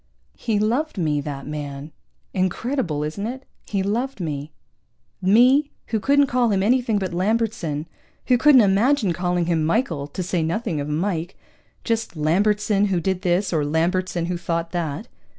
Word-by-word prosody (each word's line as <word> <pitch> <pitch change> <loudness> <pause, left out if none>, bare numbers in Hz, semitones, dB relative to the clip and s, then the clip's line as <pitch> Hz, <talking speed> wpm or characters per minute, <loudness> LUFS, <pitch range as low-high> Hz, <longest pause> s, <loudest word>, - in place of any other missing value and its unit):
He 220 -3 -1
loved 240 +8 0
me, 150 -4 0
that 140 -1 -6
man. 145 0 -6 0.4
Incredible, 185 - -1
isn't 180 +8 -3
it? 260 +3 -7 0.2
He 195 -2 -1
loved 235 +5 -2
me. 150 -3 -4 0.7
Me, 250 +10 +5 0.2
who 220 - 0
couldn't 285 +5 +4
call 245 -2 +1
him 195 -2 +1
anything 235 -1 +2
but 190 -3 -3
Lambertson, 185 -6 -1 0.4
who 250 - +4
couldn't 265 0 +6
imagine 210 +1 +3
calling 175 0 0
him 165 -2 +1
Michael, 165 - 0
to 180 +5 -5
say 175 -1 -1
nothing 165 - -1
of 145 - -4
Mike 170 +2 -2 0.5
just 230 -6 -2
Lambertson, 200 +6 +2
who 190 -3 +1
did 185 +1 -1
this, 180 +1 +1
or 155 -2 +1
Lambertson 170 +3 0
who 175 0 -2
thought 170 -1 -2
that. 170 +3 -3
185 Hz, 155 wpm, -22 LUFS, 160-225 Hz, 0.7 s, couldn't